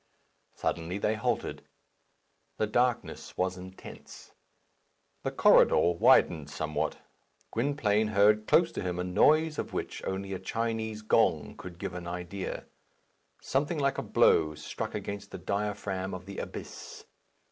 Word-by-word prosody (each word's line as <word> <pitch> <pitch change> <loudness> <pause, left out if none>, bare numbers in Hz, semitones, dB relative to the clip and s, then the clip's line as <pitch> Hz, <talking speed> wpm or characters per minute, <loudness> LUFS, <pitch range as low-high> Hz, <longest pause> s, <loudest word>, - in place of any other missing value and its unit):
Suddenly 85 +3 -2
they 105 +1 +1
halted. 110 - -2 1.0
The 110 - +1
darkness 120 +2 -1
was 95 0 0
intense. 95 +1 -11 0.9
The - - -1
corridor - - +5
widened 80 -3 +4
somewhat. 75 +1 -2 0.5
Gwynplaine 115 -4 +1
heard 105 +1 +4
close 170 0 +4
to - - -4
him 90 -2 -2
a 90 - -1
noise 150 - +3
of - - -4
which - - -4
only 95 0 -3
a 95 - -4
Chinese 110 +1 -3
gong 95 -9 +2
could 90 -2 -10
give 95 0 -5
an 90 -1 -6
idea; 90 +2 -5 0.8
something 145 +5 0
like 140 -2 +1
a - - 0
blow 75 -1 +3
struck - - -5
against 100 0 -5
the - - -7
diaphragm 100 -2 -3
of 90 0 -9
the 100 0 -7
abyss. - - -8
100 Hz, 135 wpm, -29 LUFS, 90-110 Hz, 1.0 s, corridor